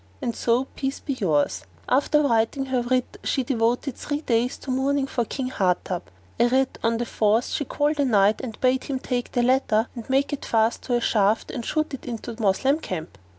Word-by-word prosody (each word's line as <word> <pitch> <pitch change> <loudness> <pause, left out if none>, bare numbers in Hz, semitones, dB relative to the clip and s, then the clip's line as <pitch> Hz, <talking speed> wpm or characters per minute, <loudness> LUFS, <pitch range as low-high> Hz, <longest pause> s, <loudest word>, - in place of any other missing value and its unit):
And 235 - -3
so 240 +2 +2
peace 270 0 -3
be 280 - -3
yours!" 150 - 0 0.2
After 295 +3 +3
writing 235 +1 +1
her 260 -2 0
writ 255 +1 -1
she 265 - 0
devoted 245 +2 0
three 290 0 -3
days 240 -2 0
to 265 - -6
mourning 270 +2 +1
for 240 -3 -1
King 255 +2 -3
Hardub; 180 -4 0 0.4
arid, 255 +2 +2
on 230 0 +2
the 240 - -2
fourth, 220 +1 +1
she 290 - -2
called 295 +3 0
a 285 - +3
Knight 210 -3 +3
and 225 -4 -7
bade 255 0 +2
him 275 - -2
take 250 -1 -3
the 245 - +2
letter 245 -3 +2
and 235 0 -9
make 275 +2 +2
it 285 - -4
fast 225 +1 +1
to 245 - +1
a 240 - +1
shaft 215 -1 +2
and 245 - -4
shoot 310 +4 -1
it 270 - -7
into 235 0 -5
the 225 - -9
Moslem 265 +9 +2
camp. 175 - -6
245 Hz, 205 wpm, -24 LUFS, 225-270 Hz, 0.4 s, After